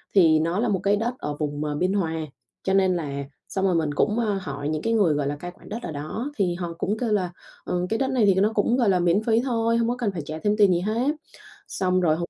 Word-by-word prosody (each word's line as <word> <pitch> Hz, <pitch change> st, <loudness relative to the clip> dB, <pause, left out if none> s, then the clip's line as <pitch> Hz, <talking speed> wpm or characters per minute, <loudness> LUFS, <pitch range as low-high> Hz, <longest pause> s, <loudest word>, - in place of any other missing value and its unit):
thì 160 Hz, -5 st, +6 dB
nó 165 Hz, +5 st, 0 dB
là 235 Hz, -, +1 dB
một 195 Hz, -3 st, +1 dB
cái 200 Hz, +1 st, +3 dB
đất 230 Hz, +4 st, -1 dB
ở 150 Hz, 0 st, -3 dB
vùng, 145 Hz, -1 st, -2 dB
ờ, 150 Hz, -1 st, -2 dB
Biên 180 Hz, +5 st, +1 dB
Hòa. 170 Hz, -5 st, 0 dB, 0.5 s
Cho 190 Hz, -, 0 dB
nên 190 Hz, -1 st, +3 dB
là 140 Hz, -4 st, -3 dB, 0.3 s
xong 190 Hz, 0 st, -1 dB
rồi 185 Hz, -2 st, +2 dB
mình 155 Hz, -3 st, 0 dB
cũng, 210 Hz, +9 st, +1 dB
à, 210 Hz, -4 st, 0 dB
hỏi 145 Hz, -1 st, -4 dB
những 155 Hz, -1 st, -2 dB
cái 230 Hz, -, 0 dB
người, 200 Hz, -8 st, +3 dB
gọi 145 Hz, -1 st, -1 dB
là, 145 Hz, -, -1 dB
cai 175 Hz, +5 st, -7 dB
quản -, -, -16 dB
đất 220 Hz, -, -4 dB
ở 170 Hz, -, -4 dB
đó 155 Hz, -, -4 dB
thì 180 Hz, -4 st, +1 dB
họ 175 Hz, -1 st, -4 dB
cũng 205 Hz, +5 st, -1 dB
kêu 230 Hz, -1 st, -1 dB
là, 185 Hz, -4 st, +1 dB, 0.3 s
ờ, 180 Hz, 0 st, -1 dB
cái 225 Hz, -, 0 dB
đất 270 Hz, -, +1 dB
này 250 Hz, -5 st, +3 dB
thì 195 Hz, -, +5 dB
nó 200 Hz, +3 st, +3 dB
cũng, 220 Hz, +3 st, +2 dB
gọi 235 Hz, -5 st, +3 dB
là, 185 Hz, -2 st, +3 dB
miễn 175 Hz, +4 st, +2 dB
phí 225 Hz, 0 st, +3 dB
thôi, 230 Hz, -3 st, +1 dB
hông 230 Hz, 0 st, +1 dB
có 245 Hz, -, 0 dB
cần 235 Hz, -5 st, -1 dB
phải 175 Hz, -4 st, -4 dB
trả 155 Hz, +2 st, -5 dB
thêm 210 Hz, 0 st, +2 dB
tiền 205 Hz, -3 st, +6 dB
gì 175 Hz, -, +2 dB
hết. 230 Hz, -, 0 dB, 0.5 s
Xong 185 Hz, -1 st, 0 dB
rồi 160 Hz, -3 st, +3 dB
hông 170 Hz, +1 st, -4 dB
190 Hz, 290 wpm, -24 LUFS, 165-220 Hz, 0.5 s, thì